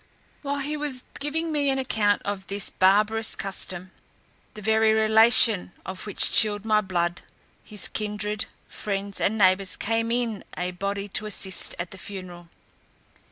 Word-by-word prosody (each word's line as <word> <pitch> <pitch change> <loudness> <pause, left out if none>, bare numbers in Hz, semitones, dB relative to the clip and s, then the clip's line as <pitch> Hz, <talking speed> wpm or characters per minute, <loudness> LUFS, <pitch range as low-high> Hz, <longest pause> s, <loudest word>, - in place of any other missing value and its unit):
While 280 0 -2
he 295 +2 -3
was 290 -4 -3 0.2
giving 320 +3 -2
me 290 -2 +1
an 270 - +1
account 215 -6 +1
of 200 -1 -4
this 200 -1 -1
barbarous 210 +4 +3
custom, 185 -1 -4 0.6
the 210 - -8
very 220 +1 +3
relation 220 -3 +5
of 190 +2 -7
which 205 - +1
chilled 210 -1 +3
my 215 -1 +3
blood, 175 -3 -2 0.4
his 210 -2 -1
kindred, 210 0 -3 0.2
friends, 200 -1 -3
and 220 - +1
neighbours, 190 -1 +3
came 225 +1 -1
in 235 -4 -1
a 180 0 -2
body 200 +2 -3
to 215 +2 -2
assist 190 -3 -1
at 175 0 -5
the 190 - -9
funeral. 175 -2 -9
210 Hz, 150 wpm, -25 LUFS, 190-225 Hz, 0.6 s, relation